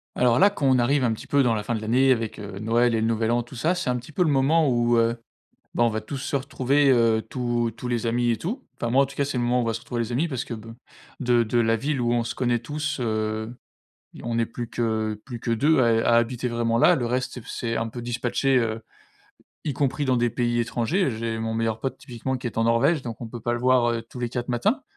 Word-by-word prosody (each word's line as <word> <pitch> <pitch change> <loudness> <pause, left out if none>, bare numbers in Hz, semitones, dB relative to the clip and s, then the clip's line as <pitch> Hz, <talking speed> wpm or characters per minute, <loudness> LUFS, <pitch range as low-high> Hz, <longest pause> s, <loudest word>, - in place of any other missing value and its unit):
Alors 125 -1 +3
là 200 - +7
quand 135 -9 +2
on - - +3
arrive 135 +3 +2
un 115 - +2
petit 110 - -9
peu 140 -1 +3
dans 120 -2 +2
la 105 - -1
fin 120 - -2
de 110 - -4
l'année 125 +5 +3
avec, 115 -3 -1
heu, 100 -2 -7
Noël 115 +2 +2
et - - +1
le - - +1
nouvel 115 0 +1
An, 120 0 +1
tout 120 +3 -13
ça, 165 +9 +1
c'est 180 -7 -2
un - - 0
petit 125 +5 -10
peu 180 - +1
le 165 - +1
moment 145 +3 +3
où, 120 -2 +2
heu, 115 0 +2 0.6
ben, 120 - +3
on 120 - +4
va 110 0 -3
tous 110 +6 -6
se 135 - -3
retrouver, 140 +1 +1
heu, 115 -3 +4
tous 120 -2 -1
tous 125 - -5
les 120 -1 -1
amis 120 +1 +1
et 115 - 0
tout. 225 - -4
Enfin, 120 - -3
moi 135 +3 +4
en - - 0
tout 140 - -11
cas, 140 - +1
c'est 140 -2 -3
le 120 - 0
moment 120 +1 +2
où - - +2
on - - -2
va 115 - 0
se 110 - -5
retrouver 120 -2 -3
les 115 +1 -4
amis 140 +8 +1
parce 130 -5 -3
que - - -7
be 115 +1 -10 0.5
de 120 -2 +3
de 120 +2 0
la 115 -1 +3
ville 135 +3 -1
où 120 0 +1
on 120 -1 +1
se 115 - -4
connaît 120 -2 +1
tous, 150 +6 -3
heu, 110 -1 -2 0.6
i - - -11
on 115 -1 -2
est 115 - +2
plus 115 +1 -6
que 110 -2 -1
plus 120 -4 -7
que 115 - -5
2 145 +6 +3
à 115 -2 +4
é 115 0 +2
à 115 - +4
habiter 120 +1 +1
vraiment 115 -1 0
là, 175 +9 +5
le 125 -6 -1
reste 125 +2 -1
s'est 125 - -7
f - - -17
s'est 115 -1 -3
un 115 - -1
peu 120 +2 -7
dispatché, 120 +3 0
heu, 115 -2 -1 0.8
y 145 - -1
compris 140 +1 -1
dans 130 -2 +2
des 120 0 +2
pays 120 0 0
étrangers. 130 - 0
J'ai 115 0 -3
mon 110 0 -2
meilleur 115 -1 -1
pote 135 - -3
typiquement 130 +2 -4
qui 125 - -6
est 115 - -4
en 115 - +2
Norvège, 135 +8 +3
donc 115 -3 -7
on - - -4
peut 120 +1 -8
pas 120 +1 -1
le - - -2
voir, 125 -1 +3
heu, 115 -1 -2
tous 115 +2 -12
les 120 - -1
quatre 120 0 -4
matins. 210 - 0
120 Hz, 290 wpm, -24 LUFS, 115-130 Hz, 0.8 s, là